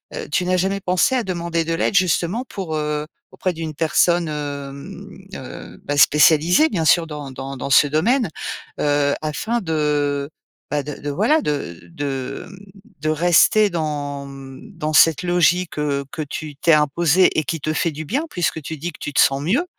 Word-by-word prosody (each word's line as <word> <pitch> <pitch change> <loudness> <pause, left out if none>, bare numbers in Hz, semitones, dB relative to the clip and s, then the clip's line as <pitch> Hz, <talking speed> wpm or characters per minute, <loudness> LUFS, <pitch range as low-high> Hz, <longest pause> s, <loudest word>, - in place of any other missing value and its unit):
heu, - - -6
tu 180 +4 +1
n'as 185 +1 +1
jamais 190 +2 0
pensé 185 +6 +1
à 250 - +1
demander 170 -3 -2
de 165 - -1
l'aide 165 - 0
justement 185 +5 +1
pour, 185 -9 -5
heu. 150 0 -2 0.3
Auprès 185 - -2
d'une 160 -2 -5
personne, 170 +2 +2
hem, 140 -2 -6 0.3
heu, - - -9
bah, 145 - -2
spécialisée 160 - +5
bien 165 -5 -1
sûr 165 +1 +4
dans 150 -3 -7
dans 135 +1 -7
dans 135 - -5
ce 145 - +6
domaine, 205 - +1 0.5
heu, 145 -1 +2
afin 220 +10 -2
de, 150 -4 -1 0.4
bah, 145 -1 0
de 150 - -6
de 145 - -4
voilà 220 - +2
de 140 - -3
de, 135 -2 -4
mmh, 195 - -12 0.5
de 155 - -1
rester 175 +6 +4
dans, 145 -4 -3
mmh, 135 -1 -11
dans 155 +1 -2
cette 165 +2 +5
logique, 175 0 +1
heu, 140 -2 -1
que 175 - -5
tu 150 0 -7
t'es 165 +3 +3
imposée 155 +4 +3
et 155 - +2
qui 165 +2 -3
te 155 +3 -1
fait 165 - 0
du 155 +1 -7
bien 270 - -1
puisque 170 - -2
tu 155 +2 -6
dis 170 +5 -4
que - - -15
tu 145 - -5
te - - +1
sens 135 0 +3
mieux, 230 - +1
155 Hz, 190 wpm, -21 LUFS, 145-175 Hz, 0.5 s, ce